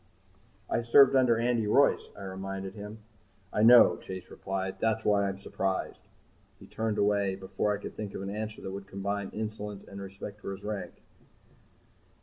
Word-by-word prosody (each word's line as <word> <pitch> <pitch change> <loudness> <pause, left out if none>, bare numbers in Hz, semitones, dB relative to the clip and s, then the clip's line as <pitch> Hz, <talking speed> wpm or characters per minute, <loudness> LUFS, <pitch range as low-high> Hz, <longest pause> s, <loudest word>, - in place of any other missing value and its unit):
"I - - 0
served 130 +4 +6
under 125 -3 +4
Andy 115 -2 +1
Royce," 140 +7 +3
I 100 - -8
reminded 95 0 -5
him. 105 +1 -9 0.5
"I - - +1
know," 120 +2 +8
Chase 95 -1 -8
replied. 95 0 -4
"That's 110 0 0
why 100 -1 +3
I'm 95 - -5
surprised." 95 -1 -3 0.6
He - - -13
turned 110 -1 -2
away 100 -2 +2
before 95 +2 -2
I 105 - 0
could - - -8
think 105 -2 -6
of - - -4
an 100 - -4
answer 110 0 -5
that 95 - -4
would 100 0 -7
combine 100 0 -3
insolence 105 -2 -5
and 100 0 -8
respect 100 +2 -8
for 100 - -4
his 95 - -10
rank. 105 -1 -5
100 Hz, 170 wpm, -29 LUFS, 95-110 Hz, 0.6 s, know